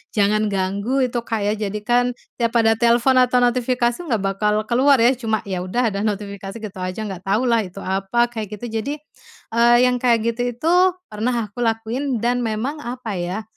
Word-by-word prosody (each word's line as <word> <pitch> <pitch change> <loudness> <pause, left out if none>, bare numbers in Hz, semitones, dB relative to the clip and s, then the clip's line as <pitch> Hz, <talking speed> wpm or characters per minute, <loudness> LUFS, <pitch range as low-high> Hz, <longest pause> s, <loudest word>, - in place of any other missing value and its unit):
jangan 215 +1 +2
ganggu 200 +7 0
itu 245 -1 -1
Kak 225 -3 -3
ya 205 - +1
jadikan 240 +4 0 0.2
tiap 235 0 0
ada 225 -1 +3
telepon 240 +2 +4
atau 250 0 +3
notifikasi 245 0 +1
nggak 240 - -2
bakal 210 +2 0
keluar 260 +6 +4
ya, 240 0 +4
cuma 225 -4 -2
ya 190 -3 -4
udah 220 +5 0
ada 200 - -3
notifikasi 200 -1 -5
gitu 210 -4 -8
aja 185 +4 -4
nggak 195 -3 -7
tahu 210 +6 +2
lah 235 -2 +3
itu 195 +2 -10
apa, 195 +6 0
kayak 215 -3 -5
gitu. 225 +1 -4
Jadi, 280 +6 -3 0.6
eee, 235 +1 +5
yang 250 -1 +2
kayak 235 -2 +2
gitu 235 - -5
itu, 315 +8 0 0.4
pernah 220 0 -2
aku 245 - -11
lakuin 235 +2 -1
dan 245 +1 +1
memang 240 +6 -2
apa 245 -4 -6
ya, 180 +5 -3
230 Hz, 185 wpm, -21 LUFS, 210-245 Hz, 0.6 s, eee